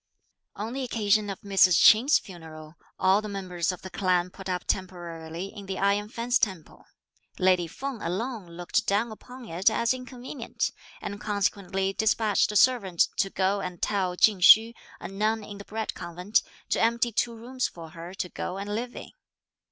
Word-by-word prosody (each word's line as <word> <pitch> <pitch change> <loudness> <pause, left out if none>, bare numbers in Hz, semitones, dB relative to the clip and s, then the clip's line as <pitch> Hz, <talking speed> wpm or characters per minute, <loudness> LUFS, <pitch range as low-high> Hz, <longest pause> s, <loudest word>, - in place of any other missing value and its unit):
On 220 +3 -5
the 270 - -3
occasion 215 -4 +1
of 195 - -6
Mrs. 195 -3 +4
Ch'in's 240 +7 +7
funeral, 160 -4 -11 0.2
all 190 +2 +3
the 215 - -6
members 185 -3 -2
of 180 - -9
the 185 - -8
clan 180 -2 +1
put 195 0 -9
up 180 -1 -2
temporarily 175 -1 -4
in 200 -2 -9
the 190 -1 -4
Iron 200 +1 +1
Fence 240 +2 0
Temple; 185 -7 -3 0.5
lady 185 -2 +3
Feng 260 - -6
alone 185 -1 -4
looked 175 0 -1
down 215 +4 +1
upon 250 +3 -11
it 180 +4 +2
as 235 +2 +1
inconvenient, 255 0 -5 0.3
and 205 0 -5
consequently 195 -2 -1
despatched 215 0 +2
a - - -7
servant 200 -8 +3
to 195 - +1
go 195 +1 0
and 180 -2 -6
tell 185 -3 0
Ch'ing 210 -1 +4
Hsü, 220 +5 +8 0.3
a - - -6
nun 215 +3 -1
in 205 -1 -9
the 200 - -9
Bread 220 0 -4
Convent, 180 +5 -1 0.3
to - - +1
empty 235 +1 +2
two 230 +2 0
rooms 250 +2 -3
for 165 -2 -11
her 175 +1 -9
to 185 - -3
go 180 +1 -5
and 200 +1 -4
live 240 +3 -4
in. - - -9
200 Hz, 175 wpm, -27 LUFS, 180-225 Hz, 0.5 s, Hsü